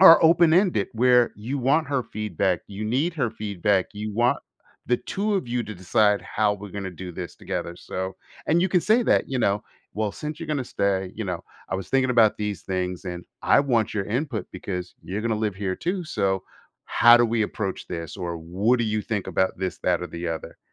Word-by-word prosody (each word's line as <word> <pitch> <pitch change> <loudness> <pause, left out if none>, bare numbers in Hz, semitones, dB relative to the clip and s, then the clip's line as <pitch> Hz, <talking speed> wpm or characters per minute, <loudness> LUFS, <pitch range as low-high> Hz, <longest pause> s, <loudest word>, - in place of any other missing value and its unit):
are 170 -3 +10
open 165 0 +6
ended 170 - +3
where 125 +1 +4
you 125 +7 -3
want 145 +6 +2
her 140 -3 +1
feedback, 100 -5 -1
you 105 +2 -6
need 140 +10 0
her 130 -8 0
feedback, 100 -3 0
you 105 0 -4
want 120 +3 +2 0.5
the 125 - +3
2 205 +1 -2
of 180 -11 -1
you 120 0 0
to 110 -1 -7
decide 105 +3 +2
how 105 -1 +1
we're 100 -1 -8
gonna 100 -2 -4
do 90 +1 -7
this 90 0 -7
together 85 - -4
so, 95 +1 -5 0.3
and 165 +3 +3
you 185 - +2
can 180 -1 +3
say 225 +3 +4
that, - - +3
you 130 - -1
know, 105 -3 +1 0.3
well, 105 -1 0
since 150 +5 -6
you're 165 - -7
gonna 145 -4 -1
stay, 95 -4 -1
you 110 - -4
know, 90 -3 -3 0.3
I 95 - 0
was 95 -1 -6
thinking 130 -1 +2
about 115 -3 +5
these 105 -2 -3
things, 90 -1 -3
and 90 -1 -5 0.2
I - - +5
want 120 -7 +1
your 100 -2 0
input 120 - -2
because 90 -1 -5
you're 100 +4 -3
gonna 115 -2 0
live 105 -3 -1
here 95 -2 -2
too 180 0 -2
so, 95 -10 0 0.4
how 120 0 +7
do 120 - +4
we 115 -1 +1
approach 100 -2 -3
this? 85 0 -6
Or 85 -3 -3
what 95 +9 +1
do 120 - +1
you 110 0 0
think 105 -4 -2
about 95 0 +1
this, 95 -1 -3
that, 90 -1 +1
or 90 - -3
the 85 0 -5
other? 80 -1 -5
105 Hz, 215 wpm, -25 LUFS, 95-125 Hz, 0.5 s, are